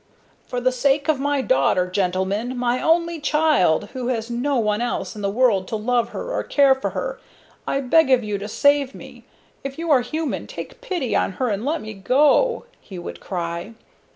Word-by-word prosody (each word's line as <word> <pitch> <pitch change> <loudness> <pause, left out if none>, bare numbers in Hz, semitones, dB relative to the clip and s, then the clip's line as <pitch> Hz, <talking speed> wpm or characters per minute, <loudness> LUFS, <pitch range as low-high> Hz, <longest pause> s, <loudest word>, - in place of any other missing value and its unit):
"For 250 - -3
the 255 +1 +2
sake 275 +3 +1
of 300 -4 +2
my 285 0 0
daughter, 180 - +2
gentlemen 190 +6 -1
my 245 0 0
only 335 0 +2
child 290 - +2
who 255 -2 -4
has 235 -2 -2
no 265 +4 0
one 215 -1 +1
else 240 -1 -3
in 210 - -7
the 200 - 0
world 205 -4 +2
to - - -3
love 235 +2 0
her - - -6
or - - 0
care 280 -2 +4
for 265 - -3
her, - - -3 0.5
I 275 - 0
beg 280 +3 +4
of 255 -2 +4
you 210 -2 -3
to 205 - -5
save 285 +3 +2
me. - - -12 0.4
If 275 0 -6
you 330 -1 -2
are 265 -4 +5
human, 310 +5 -3
take - - -9
pity 350 - -2
on - - +1
her 250 +6 -1
and 205 0 -2
let 310 +5 -1
me 215 0 -7
go!" 290 - +2
he 190 - -11
would 175 - -7
cry. 170 +3 -5
250 Hz, 200 wpm, -22 LUFS, 210-285 Hz, 0.5 s, are